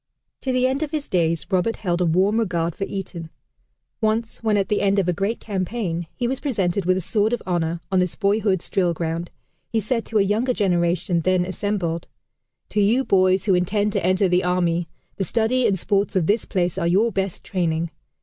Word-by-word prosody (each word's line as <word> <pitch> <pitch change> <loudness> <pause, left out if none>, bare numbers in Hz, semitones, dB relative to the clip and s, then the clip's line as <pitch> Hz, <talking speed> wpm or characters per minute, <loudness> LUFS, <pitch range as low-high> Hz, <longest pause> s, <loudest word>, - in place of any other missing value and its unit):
To 265 - -1
the 255 0 +2
end 265 +3 0
of 310 - -1
his 300 -2 -3
days, 165 -2 +1
Roberts 190 +4 0
held 175 -3 0
a 175 - +2
warm 190 +7 +3
regard 170 -6 0
for 195 - -3
Eton. 175 -5 -6 0.7
Once 220 +1 0
when 215 -2 +2
at 195 -1 +1
the 210 - +1
end 200 0 +2
of 195 -3 +2
a 180 - +2
great 200 +7 -1
campaign, 185 -4 -3
he 240 - -1
was 265 +1 -2
presented 200 - -1
with 185 +1 +3
a - - -1
sword 215 +5 +1
of 240 - -2
honor, 170 -2 -1
on 190 - +3
this 180 -2 0
boyhood's 200 -3 +1
drill 175 -3 +1
ground, 165 +1 -3 0.4
he 225 - +2
said 230 +2 -1
to 220 - 0
a 205 - +5
younger 220 +6 +1
generation 175 -3 +1
then 185 +1 +2
assembled: 185 -3 -2 0.6
"To 210 - +1
you 230 +6 +3
boys 185 0 +3
who 195 - +3
intend 205 +4 +1
to - - 0
enter 185 +2 +3
the 180 +1 +2
army, 175 -1 +1 0.3
the 195 - 0
studies 235 +5 +1
and 195 - +1
sports 200 +3 0
of 180 -4 +2
this 210 +6 +1
place 180 -3 -1
are 170 - 0
your 205 +7 +3
best 195 -2 -2
training. 170 -3 -1
190 Hz, 205 wpm, -22 LUFS, 175-215 Hz, 0.7 s, a